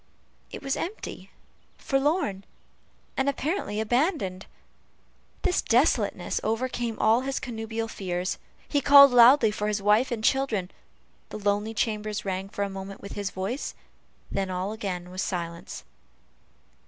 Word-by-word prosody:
It - - -8
was 275 0 0
empty, 395 +6 -6 0.5
forlorn, 270 - 0 0.7
and 265 +1 +1
apparently 280 - -2
abandoned. 220 - 0 1.0
This 360 - +2
desolateness 225 - +1
overcame 235 0 -2
all 225 +3 +4
his 270 +1 -2
connubial 225 -2 -4
fears 185 -4 -3 0.3
he 285 - +1
called 280 0 +9
loudly 240 -1 +7
for 210 0 -2
his 210 0 0
wife 210 +5 +3
and 230 -3 -3
children 220 -9 +1 0.6
the - - -6
lonely 205 +2 -1
chambers 215 -1 -2
rang 190 0 -3
for 200 - -3
a - - -1
moment 195 0 -8
with 200 - -9
his 205 -1 -3
voice, 200 +9 -4 0.6
and - - -1
then 195 -1 -1
all 185 +2 -2
again 185 -5 -5
was 185 +1 -3
silence. 170 -3 -4
215 Hz, 135 wpm, -26 LUFS, 195-255 Hz, 1.0 s, called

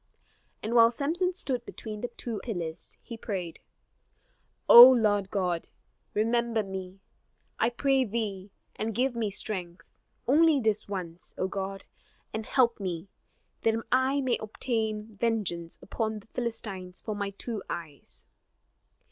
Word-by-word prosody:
And 220 - -2
while 230 -1 +7
Samson 325 +9 0
stood 260 -9 -3
between 215 -3 -8
the 245 - -2
two 235 -2 -5
pillars, 175 -7 -5
he 230 - -7
prayed: 185 -7 -5 1.1
"O 240 +2 +13
Lord 210 -6 +2
God, 180 -4 -1 0.5
remember 230 +1 +1
me, 190 -1 -7 0.6
I 225 - +3
pray 270 +2 +2
thee, 205 -3 -3 0.3
and 220 0 -3
give 255 +1 +1
me 225 -3 0
strength, 185 -3 -5 0.4
only 305 +2 +5
this 220 -3 0
once, 180 -3 -6
O 185 - 0
God: 195 0 -5 0.5
and 220 -1 -4
help 235 -4 +3
me, 180 -1 -4 0.5
that 225 0 +2 0.2
I 260 +2 +3
may 255 -3 0
obtain 220 -1 -3
vengeance 195 -7 -1
upon 220 +1 -2
the 210 - -13
Philistines 200 -6 -4
for 215 - -4
my 200 -1 -2
two 210 +2 -5
eyes!" 155 -5 -7
220 Hz, 130 wpm, -28 LUFS, 195-235 Hz, 1.1 s, O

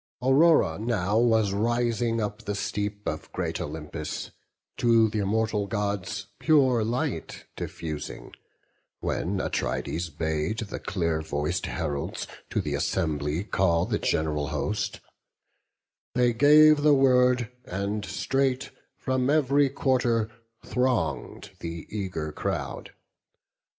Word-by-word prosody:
Aurora 135 - +4
now 110 -2 +1
was 110 -4 +3
rising 115 +1 +1
up 105 -1 -3
the 105 - -2
steep 105 0 -3
Of - - -4
great - - -3
Olympus, 75 +1 -5 0.5
to 115 -2 +4
th' - - -7
immortal 105 0 0
Gods 100 -2 -2
Pure 130 -7 +4
light 120 +3 -3
diffusing; 75 -2 -6 0.7
when - - -1
Atrides 65 +7 -2
bade 80 +6 -2
The 110 -3 -4
clear 85 -4 -1
voic'd 75 -1 -2
heralds 70 -1 -3 0.2
to - - 0
th' - - -3
Assembly 75 +1 -1
call 90 -5 +2
The - - -1
gen'ral 75 -2 0
host; 105 +8 -2 1.1
they 125 -1 +3
gave 150 +4 +7
the 150 -1 +6
word, 125 -2 +4
and 100 +3 -3
straight 135 +2 -1 0.3
From 130 0 0
ev'ry 145 -1 +3
quarter 125 -5 +1 0.3
throng'd 125 -1 -1
the 85 -1 -6
eager 95 -7 -3
crowd. - - -4
105 Hz, 110 wpm, -27 LUFS, 85-125 Hz, 1.1 s, gave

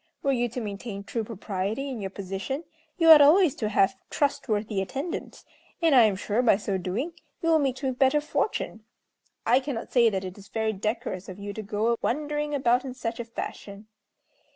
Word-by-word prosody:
Were 275 - +2
you 245 -2 +1
to 240 - -5
maintain 200 -1 -6
true 225 +2 -3
propriety 210 +3 -3
in 255 -5 -5
your 195 - -3
position, 195 - -4 0.3
you 330 -2 +7
ought 305 -2 +11
always 315 +1 +6
to 215 - -1
have 205 +2 +3
trustworthy 220 -8 0
attendants; 280 - -5 0.3
and 330 -3 +3
I 245 -4 +8
am 210 -3 +2
sure, 205 +4 0
by 225 -6 +4
so 200 -2 -2
doing, 220 - -3 0.3
you 330 - +2
will 320 -1 +5
meet 270 -1 -1
with 260 -2 -2
better 270 +2 +4
fortune. 295 - -2 0.6
I 245 +3 +5
cannot 265 -4 -5
say 235 -2 +5
that 195 -3 -2
it 185 +2 -8
is 200 - -14
very 220 +1 -1
decorous 210 -2 -3
of 185 - -8
you 205 0 -6
to 220 - -5
go 215 +3 0
wandering 295 +2 -1
about 250 -2 +2
in 260 -2 -6
such 230 -2 -4
a - - -2
fashion. 205 -2 -7
235 Hz, 195 wpm, -26 LUFS, 205-275 Hz, 0.6 s, ought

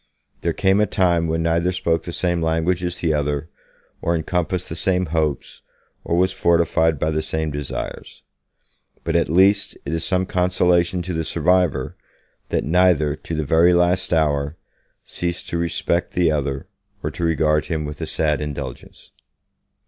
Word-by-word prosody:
There - - 0
came 95 +2 +2
a 105 - +2
time 85 -3 +2
when 80 +1 -1
neither 85 +2 +1
spoke 85 -3 -1
the 85 - -5
same 85 0 0
language 80 +2 0
as 90 0 -2
the 80 -2 0
other, 75 +1 -1 0.5
or 85 - +1
encompassed 90 +2 -2
the 80 - -6
same 95 +1 +1
hopes, 75 -3 -2 0.4
or 85 - -1
was 95 +1 +3
fortified 85 -2 +2
by 80 +3 0
the 80 0 0
same 80 0 -2
desires. 75 -1 -6 0.8
But, - - -2
at - - +2
least, 95 +4 +3
it - - -3
is 80 0 -1
some 95 -1 +1
consolation 90 -1 +1
to 90 +1 -4
the 80 0 -1
survivor, 90 +2 +1 0.5
that - - 0
neither, 80 -3 +3
to 80 - -6
the 80 -1 -2
very 85 +5 +4
last 90 +1 +2
hour, 75 -1 +1 0.5
ceased 85 0 -4
to 85 - -2
respect 85 +1 -1
the 85 -3 +2
other, 70 -2 -2 0.4
or - - -2
to - - -5
regard 75 -2 +2
him 80 -3 -2
with 75 +2 -7
a 80 - -3
sad 75 -2 0
indulgence. 70 -4 -7
85 Hz, 165 wpm, -21 LUFS, 80-90 Hz, 0.8 s, very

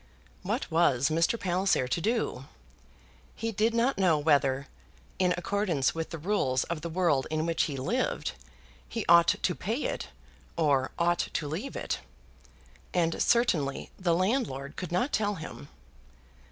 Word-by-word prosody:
What - - -3
was 140 -5 +3
Mr. 165 +8 +1
Palliser 180 -7 +1
to 145 +7 -1
do? 220 - -1 0.9
He 225 +1 -3
did 225 +2 +1
not 235 0 +2
know 175 -5 +4
whether, 140 -2 +2 0.5
in 180 -1 +3
accordance 175 -6 0
with 165 0 -4
the 165 - -5
rules 150 -7 0
of 170 -2 -4
the 170 - -4
world 160 -6 +1
in 155 0 -1
which 165 -1 +1
he 140 -3 -4
lived, 130 - -1 0.6
he - - -3
ought 170 0 +7
to 180 - +1
pay 225 +11 -3
it, - - -3 0.5
or 140 -5 +2
ought 175 0 +1
to 150 - -2
leave 185 - -4
it; - - -2 1.0
and 165 -2 +1
certainly 165 - +1
the 175 -3 +2
landlord 180 - -1
could 180 - -6
not 215 +11 0
tell 205 -1 +1
him. 160 - -8
170 Hz, 150 wpm, -29 LUFS, 145-195 Hz, 1.0 s, ought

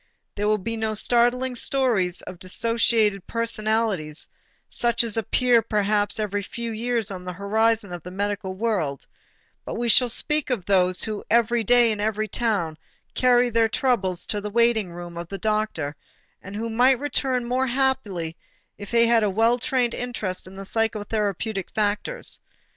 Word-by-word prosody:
There 205 +1 -1
will 215 0 +3
be 230 +4 -3
no 220 -1 -2
startling 245 +3 +2
stories 235 -8 +1
of 180 - -9
dissociated 215 0 +1
personalities, 215 -8 -1 0.4
such 235 0 +1
as 230 -3 0
appear 235 +2 +3
perhaps 210 -1 +1
every 205 -1 -1
few 230 +3 -5
years 225 -1 -1
on 185 -2 -7
the 180 0 -5
horizon 210 +1 0
of 175 - -6
the 180 - -9
medical 200 0 -3
world, 185 -10 -2 0.6
but - - -6
we 235 0 -1
shall 250 +2 +6
speak 300 +5 +1
of 230 -9 -2
those 185 -2 +3
who 215 -2 -4
every 235 0 +3
day 240 +1 +5
in 210 - -2
every 215 +1 -1
town 195 -8 -1 0.3
carry 245 -1 +3
their 225 0 +3
trouble 215 -7 0
to 205 +4 -1
the 210 - -4
waiting 225 -3 +2
room 175 0 -9
of 170 - -6
the 195 - -6
doctor 210 -8 -1 0.5
and 195 +1 -9
who 225 +2 -3
might 250 +3 +4
return 265 -3 0
more 255 +2 0
happily 235 -11 0 0.4
if 205 -1 -8
he 235 0 +4
had 230 -1 +4
more 210 -2 +1
well 225 +5 +2
trained 250 -3 0
interest 210 -8 -4
in 190 - -12
the 195 - -7
psychotherapeutic 210 -2 -2
factors. 210 - -2
220 Hz, 165 wpm, -24 LUFS, 195-235 Hz, 0.6 s, shall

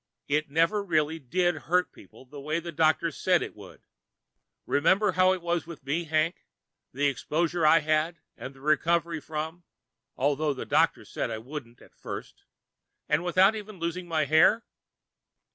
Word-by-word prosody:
"It 150 +1 0
never 165 +8 +2
really 160 -3 0
did 175 +6 +1 0.2
hurt 180 +1 +2
people - - -16
the 140 +2 -11
way 155 +3 -1
the 170 0 -7
doctors 160 +1 +1
said 180 -2 +3
it - - -8
would. 100 -3 -14 0.8
Remember 185 +8 +3
how 185 0 +4
it 185 -2 -2
was 170 -1 -1
with 160 -5 -10
me, 160 +5 -1
Hank, 155 +2 0 0.5
the 140 +3 -1
exposure 160 +5 0
I 160 +1 +6
had 155 +2 0 0.2
and 135 - -9
recovered 160 +3 +1
from, 160 +2 -5 0.5
although 145 +2 +1
the - - -6
doctors - - +1
said - - -2
I - - -3
wouldn't 120 0 -9
at - - -20
first - - -9 0.6
and 150 +3 +1
without 185 +4 +4
even 215 -1 -8
losing 175 +1 -4
my 160 -3 +1
hair? 160 +10 +4
160 Hz, 160 wpm, -27 LUFS, 150-175 Hz, 0.8 s, I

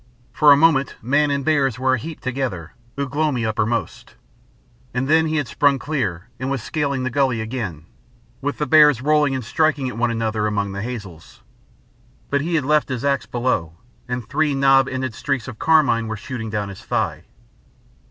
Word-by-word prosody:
For 150 -1 +6
a 140 - +8
moment, 145 -3 +3
man 140 +5 +2
and 140 -1 -1
bears 140 -6 +2
were 130 0 +1
a 130 - +1
heap 160 +6 -8
together, 125 - -4 0.2
Ugh 140 -1 -4
lomi 145 -6 0
uppermost; 110 +1 -2 0.8
and 130 +2 0
then 160 +2 +4
he 155 - -1
had 145 -4 0
sprung 140 +2 +2
clear 115 - -3
and 130 +1 -3
was 135 -5 -2
scaling 140 -4 -2
the 130 - -2
gully 130 -3 +1
again, 110 - -5 0.6
with 145 +1 -2
the 150 - -1
bears 150 -5 +6
rolling 150 -2 +3
and 130 -3 -4
striking 145 0 +1
at 115 - -8
one 120 0 +2
another 110 -2 -1
among 100 -2 -1
the 100 0 -5
hazels. 100 -8 -8 0.9
But 140 0 +2
he 165 +3 -1
had 150 -5 +1
left 150 0 +2
his 130 0 -3
axe 140 -1 0
below, 120 -10 -1 0.3
and 125 -3 -4
three 150 0 +1
knob 135 -1 +4
ended 130 -2 -3
streaks 135 -1 -2
of 120 -4 -9
carmine 135 -8 +3
were 110 0 -4
shooting 115 0 -6
down 105 -2 -3
his 95 - -10
thigh. - - -2
130 Hz, 185 wpm, -21 LUFS, 115-145 Hz, 0.9 s, a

